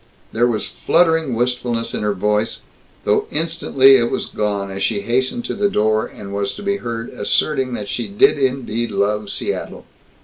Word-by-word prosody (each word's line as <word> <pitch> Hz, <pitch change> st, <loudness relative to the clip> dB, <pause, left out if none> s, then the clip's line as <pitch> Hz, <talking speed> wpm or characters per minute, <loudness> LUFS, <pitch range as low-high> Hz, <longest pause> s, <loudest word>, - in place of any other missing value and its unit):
_" -, -, -33 dB, 0.3 s
There 120 Hz, +2 st, +2 dB
was 115 Hz, -3 st, -1 dB
fluttering 160 Hz, -6 st, +2 dB
wistfulness 120 Hz, -1 st, -1 dB
in -, -, -2 dB
her 105 Hz, -1 st, 0 dB
voice, 105 Hz, +3 st, 0 dB, 0.4 s
though -, -, +1 dB
instantly 150 Hz, -4 st, +4 dB
it 120 Hz, -1 st, +1 dB
was -, -, -2 dB
gone 100 Hz, -2 st, -2 dB
as 95 Hz, 0 st, -5 dB
she 100 Hz, -, 0 dB
hastened 130 Hz, -, 0 dB
to -, -, -3 dB
the 205 Hz, -1 st, +1 dB
door 110 Hz, -, +1 dB
and 100 Hz, -1 st, -10 dB
was 100 Hz, 0 st, -2 dB
to 205 Hz, -, -9 dB
be 200 Hz, 0 st, 0 dB
heard 115 Hz, -, -5 dB
asserting 130 Hz, +4 st, 0 dB
that 105 Hz, -, -5 dB
she 120 Hz, -, -3 dB
did 200 Hz, -5 st, +3 dB
indeed 125 Hz, -3 st, -1 dB
love 105 Hz, 0 st, 0 dB
Seattle. 100 Hz, -, -4 dB
120 Hz, 180 wpm, -19 LUFS, 105-135 Hz, 0.4 s, instantly